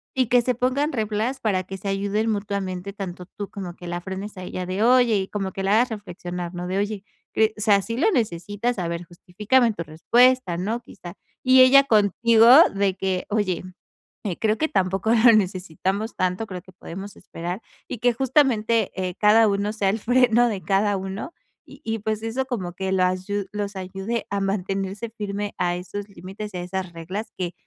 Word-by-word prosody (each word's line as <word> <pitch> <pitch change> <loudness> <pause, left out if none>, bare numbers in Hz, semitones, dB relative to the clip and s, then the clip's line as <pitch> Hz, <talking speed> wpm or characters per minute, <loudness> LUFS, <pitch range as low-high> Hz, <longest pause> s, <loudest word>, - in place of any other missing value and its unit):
y 260 -1 +3
que 245 +2 +4
se 250 +1 0
pongan 260 +5 0
reglas 220 +3 -1
para 195 -4 0
que 195 +1 -7
se 195 +2 -7
ayuden 200 +3 0
mutuamente, 200 -2 -3
tanto 180 -3 -7
tú 205 -1 -5
como 185 -4 -7
que 175 - -9
la 175 0 -4
frenes 195 +3 -6
a 185 - -7
ella 180 0 -5
de: 190 +4 -1
"Oye", 245 -2 +5
y 190 -1 -2
como 195 -2 -3
que 195 - -4
la 195 +2 +2
hagas 240 +3 +4
reflexionar, 180 -4 -6
¿no?, 175 0 -4
de: 190 +2 -1
"Oye, 205 -1 -3 0.3
cre 220 0 +2
o - - -6
sea, 200 -2 +4
¿sí 230 +3 -4
lo 390 +10 +3
necesitas? 205 - -1
A 175 - -2
ver, 170 +1 -4
justifícame 210 +8 +1
tu 170 - -5
respuesta", 215 - +3
¿no?, 220 +6 -2
quizá. 175 -6 -11 0.3
Y 255 0 +6
ella 275 +2 +8
contigo 225 +1 +4 0.3
de 195 -1 +1
que: 190 -1 -1
"Oye, 205 -5 0 0.6
eh, 185 -5 -2
creo 220 0 +1
que 315 - 0
tampoco 195 +3 0
lo 235 0 +6
necesitamos 190 +2 -1
tanto, 185 +4 -1
creo 180 -2 -6
que 185 - -16
podemos 195 +3 -9
esperar" 180 +3 -6 0.3
y - - -4
que 245 0 +3
justamente, 230 -4 +2
eh, 185 -2 -3
cada 215 +1 +6
uno 200 +1 -1
sea 200 -3 +1
el 220 +3 -1
freno 245 0 +4
de 195 -4 -4
cada 200 +4 +2
uno 195 - -6 0.3
y - - -15
y, 225 -1 -2
pues, 215 +1 -3
eso 250 +4 -2
como 190 -9 -4
que 190 +1 -3
lo 185 - +2
asyu 185 +2 -1
los 205 -1 -4
ayude 195 +5 -4
a 200 - 0
mantenerse 195 +2 -2
firme 205 0 -4
a 175 -1 0
esos 200 +3 -6
límites 195 +3 -8
y 180 - -4
a - - -3
esas 185 0 -4
reglas 185 +7 -6
que 180 -1 -3
200 Hz, 200 wpm, -23 LUFS, 185-225 Hz, 0.6 s, ella